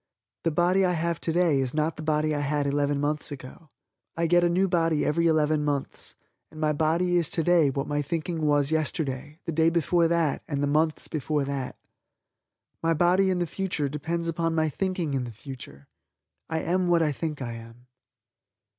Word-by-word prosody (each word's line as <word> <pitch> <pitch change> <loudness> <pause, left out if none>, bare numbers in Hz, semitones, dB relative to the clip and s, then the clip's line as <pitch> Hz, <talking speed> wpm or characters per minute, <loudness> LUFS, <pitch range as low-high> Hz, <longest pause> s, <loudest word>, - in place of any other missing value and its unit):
The - - +4
body 175 +4 +2
I 180 -1 +2
have 170 -1 -1
today 165 -3 +2
is 130 +1 -2
not 155 +1 0
the - - -8
body 155 0 +1
I 145 - -1
had 145 0 0
eleven 145 0 0
months 150 +1 -2
ago. 145 +3 -10 0.5
I 170 - +1
get 175 +1 +4
a 175 - +3
new 185 +3 +2
body 165 -3 +1
every 170 +3 +2
eleven 155 -1 +2
months 145 -2 -3 0.3
and 155 - -12
my 155 -1 +1
body 170 +4 +1
is 170 -3 +1
today 165 -2 +3
what 135 +1 -2
my 145 0 -1
thinking 165 +3 -3
was 145 0 +2
yesterday, 150 -2 -2
the - - -2
day 160 +1 +3
before 170 0 +2
that 165 -3 +1
and 140 -2 -2
the - - +3
months 155 +2 +1
before 150 -2 -1
that. 135 -2 -4 1.0
My 165 0 +2
body 180 +4 +3
in 185 - +1
the 175 - 0
future 170 -5 -2
depends 165 +4 -3
upon 165 0 -1
my 160 -1 +2
thinking 180 -2 -2
in 135 -2 0
the 120 - -6
future. 110 - -11 0.6
I 160 0 -1
am 180 +1 0
what 170 -1 +4
I 150 - +1
think 150 +1 -4
I 125 -3 -4
am. 115 +1 -12
155 Hz, 190 wpm, -26 LUFS, 145-170 Hz, 1.0 s, The